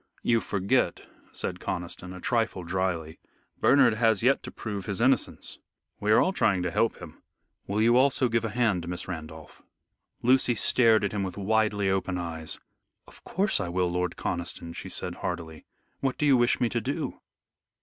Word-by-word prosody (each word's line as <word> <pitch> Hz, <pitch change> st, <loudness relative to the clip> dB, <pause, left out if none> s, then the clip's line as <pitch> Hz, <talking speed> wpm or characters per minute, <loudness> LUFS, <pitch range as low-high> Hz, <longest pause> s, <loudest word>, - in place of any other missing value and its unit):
"You 115 Hz, -1 st, +3 dB
forget," 100 Hz, -1 st, 0 dB, 0.3 s
said -, -, -4 dB
Conniston, 90 Hz, +1 st, -5 dB
a 90 Hz, -, -8 dB
trifle 115 Hz, -3 st, 0 dB
dryly, 85 Hz, -3 st, -2 dB, 0.4 s
"Bernard 130 Hz, -4 st, +5 dB
has 110 Hz, -2 st, +2 dB
yet 135 Hz, +3 st, +3 dB
to -, -, -8 dB
prove 100 Hz, -4 st, -6 dB
his 100 Hz, -1 st, -3 dB
innocence. 130 Hz, 0 st, 0 dB, 0.4 s
We 105 Hz, -, 0 dB
are -, -, +6 dB
all 190 Hz, -, +2 dB
trying 95 Hz, -, +2 dB
to 90 Hz, -, -1 dB
help 115 Hz, +6 st, +1 dB
him. -, -, -11 dB, 0.5 s
Will 105 Hz, +2 st, +1 dB
you 120 Hz, +1 st, +5 dB
also 130 Hz, 0 st, +3 dB
give 120 Hz, -1 st, 0 dB
a 115 Hz, -, -1 dB
hand, 105 Hz, -6 st, 0 dB
Miss 90 Hz, 0 st, -4 dB
Randolph?" 80 Hz, -3 st, -8 dB, 0.6 s
Lucy 125 Hz, 0 st, +4 dB
stared 110 Hz, 0 st, +4 dB
at 100 Hz, -, 0 dB
him 105 Hz, -, -2 dB
with 95 Hz, -1 st, -4 dB
widely 105 Hz, 0 st, +1 dB
open 95 Hz, -1 st, -1 dB
eyes. 80 Hz, -2 st, -4 dB, 0.5 s
"Of -, -, -16 dB
course 195 Hz, +4 st, 0 dB
I 85 Hz, -, -2 dB
will, 90 Hz, 0 st, 0 dB
Lord 90 Hz, 0 st, -1 dB
Conniston," 85 Hz, -1 st, -3 dB
she -, -, -6 dB
said -, -, -3 dB
heartily. 80 Hz, -1 st, -5 dB, 0.3 s
"What 135 Hz, -2 st, -1 dB
do 150 Hz, -, 0 dB
you 140 Hz, -2 st, +6 dB
wish 120 Hz, -1 st, +3 dB
me 120 Hz, -, +2 dB
to 115 Hz, -, -1 dB
do?" -, -, -3 dB
100 Hz, 180 wpm, -27 LUFS, 90-120 Hz, 0.6 s, are